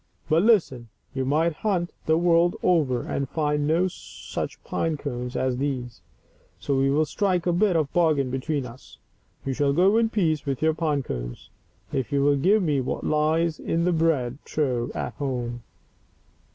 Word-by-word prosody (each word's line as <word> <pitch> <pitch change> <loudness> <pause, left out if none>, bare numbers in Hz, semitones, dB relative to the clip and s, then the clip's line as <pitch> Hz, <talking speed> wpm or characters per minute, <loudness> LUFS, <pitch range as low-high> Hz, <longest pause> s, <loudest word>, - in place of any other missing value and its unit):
But 160 +1 +4
Ibten, 175 - +2 0.3
you 130 -1 -2
might 155 +5 +2
hunt 180 -5 -1 0.2
the 160 0 +4
world 170 0 +3
over, 145 -9 +2
and 140 -2 -3
find 150 -2 0
no 170 +4 +3
such 180 - -7
pine 165 -2 -1
cones 125 -3 -5
as 130 -1 0
these; 130 -3 -3 0.6
so 140 - -1
we 135 +1 +2
will 150 +3 +2
strike 180 +2 0
a 175 - +2
bit 190 +1 +2
of 160 -2 +3
a - - -37
bargain 155 -7 +2
between 135 +1 -2
us. 125 +2 -12 0.5
You 135 - -1
shall 140 +1 +1
go 190 +7 +4
in 230 -1 +3
peace 165 -9 0
with 135 -2 -2
your 160 0 +2
pine 155 -3 -1
cones - - -6 0.4
if 130 -5 -2
you 140 -1 +2
will 145 0 +4
give 195 +9 +3
me 145 -5 +1
what 130 - -3
lies 155 +2 +1
in 165 +1 -1
the 180 - +2
bread 145 -6 +1
trough 125 -6 -1
at - - -3
home." 120 -4 -3
150 Hz, 180 wpm, -25 LUFS, 135-170 Hz, 0.6 s, But